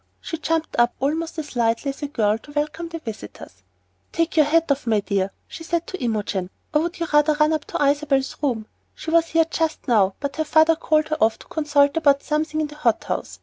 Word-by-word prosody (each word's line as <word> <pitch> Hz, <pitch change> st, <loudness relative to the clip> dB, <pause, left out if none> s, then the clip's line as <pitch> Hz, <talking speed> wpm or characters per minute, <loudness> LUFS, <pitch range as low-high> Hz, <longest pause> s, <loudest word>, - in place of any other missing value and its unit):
She 325 Hz, -, -6 dB
jumped 325 Hz, 0 st, -1 dB
up 240 Hz, 0 st, +3 dB
almost 320 Hz, +5 st, -2 dB
as 300 Hz, -4 st, -6 dB
lightly 230 Hz, +3 st, +1 dB
as 275 Hz, -, -6 dB
a 290 Hz, -, -2 dB
girl 220 Hz, -6 st, +1 dB
to 290 Hz, -, -15 dB
welcome 305 Hz, +3 st, -2 dB
the 330 Hz, -, -5 dB
visitors. 225 Hz, -9 st, -9 dB, 0.5 s
"Take 330 Hz, 0 st, -1 dB
your 305 Hz, -3 st, +5 dB
hat 330 Hz, 0 st, +2 dB
off, 275 Hz, -3 st, -1 dB
my 220 Hz, -2 st, +3 dB
dear," 195 Hz, -1 st, -1 dB, 0.2 s
she 330 Hz, -, -9 dB
said 335 Hz, 0 st, -1 dB
to 375 Hz, -, -6 dB
Imogen, 205 Hz, -5 st, -2 dB, 0.2 s
"or 300 Hz, -, +3 dB
would 340 Hz, +2 st, -4 dB
you 335 Hz, -, 0 dB
rather 295 Hz, +1 st, +5 dB
run 305 Hz, +1 st, +3 dB
up 310 Hz, -2 st, -2 dB
to 290 Hz, -, -1 dB
Isabel's 280 Hz, -1 st, +1 dB
room? 240 Hz, -7 st, -1 dB, 0.3 s
She 320 Hz, -, -6 dB
was 335 Hz, 0 st, +4 dB
here 325 Hz, 0 st, +3 dB
just 320 Hz, -1 st, -2 dB
now, 200 Hz, -6 st, +3 dB
but 280 Hz, 0 st, -4 dB
her 315 Hz, -, +1 dB
father 315 Hz, +1 st, +4 dB
called 310 Hz, -1 st, +1 dB
her 310 Hz, -, 0 dB
off 220 Hz, 0 st, +3 dB
to -, -, -15 dB
consult 290 Hz, -1 st, +2 dB
about 285 Hz, -3 st, +3 dB
something 310 Hz, 0 st, -1 dB
in 310 Hz, -, +1 dB
the 295 Hz, 0 st, -10 dB
hot 240 Hz, -7 st, +1 dB
house. -, -, -4 dB
300 Hz, 230 wpm, -22 LUFS, 250-320 Hz, 0.5 s, your